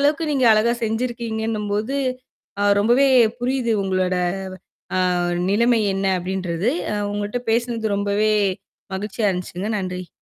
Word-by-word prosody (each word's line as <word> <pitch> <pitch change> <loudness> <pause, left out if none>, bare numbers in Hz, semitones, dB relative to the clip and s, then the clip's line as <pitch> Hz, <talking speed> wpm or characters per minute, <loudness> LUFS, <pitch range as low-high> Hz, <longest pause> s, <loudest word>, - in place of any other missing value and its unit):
அளவுக்கு 300 +2 +1
நீங்க 260 -4 +2
அழகா 225 +3 +3
செஞ்சிருக்கீங்கன்னும்போது, 220 0 -2 0.8
ரொம்பவே 240 +6 +4 0.3
புரியுது 245 -2 0
உங்களோட 185 -1 0 0.8
அ - - +2 0.5
நிலைமை 235 +3 +3 0.2
என்ன 195 0 0
அப்டின்றது. 185 +1 -2 0.2
அ - - -1 0.2
உங்கள்ட்ட 205 +4 -3
பேசினது 230 -2 0
ரொம்பவே 205 +2 +1 0.6
மகிழ்ச்சியா 210 +2 -1
இருந்துச்சுங்க 180 +3 -4
நன்றி. 185 -1 -5
215 Hz, 105 wpm, -21 LUFS, 195-240 Hz, 0.8 s, ரொம்பவே